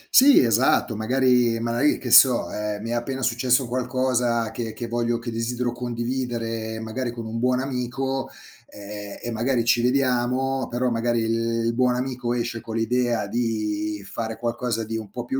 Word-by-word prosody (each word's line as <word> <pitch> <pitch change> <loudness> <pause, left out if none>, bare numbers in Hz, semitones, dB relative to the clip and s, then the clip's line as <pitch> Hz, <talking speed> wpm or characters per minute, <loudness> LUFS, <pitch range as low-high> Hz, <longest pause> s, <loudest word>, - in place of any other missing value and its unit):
Sì 275 +2 +8
esatto 115 0 +2
magari 125 0 +2
magari, 120 +5 +1
che 125 - -5
so, 125 -1 +6
ehm, 105 0 -4
mi 115 - -4
è - - 0
appena 130 +3 -3
successo 125 +1 +2
qualcosa 125 -2 0
che 115 -2 -4
che 120 - -6
voglio 120 0 0
che 120 0 -6
desidero 120 +2 -2
condividere 120 -2 -3
magari 115 +3 -3
con 115 -1 -7
un 110 +1 -4
buon 125 +1 +2
amico, 135 +1 -3 0.4
ehm, 105 0 -9
e 120 - -3
magari 120 +1 0
ci 120 0 +3
vediamo, 130 0 +1
però 125 +1 -1
magari 115 0 0
il 115 +1 0
buon 125 0 +2
amico 125 -1 -3
esce 120 -1 -3
con 110 0 -7
l'idea 120 0 0
di 105 -2 -2
fare 110 +1 -4
qualcosa 120 -1 -2
di 110 +1 -4
un 110 -3 -7
po' 120 +3 -6
più 130 +2 -2
120 Hz, 170 wpm, -24 LUFS, 115-125 Hz, 0.4 s, Sì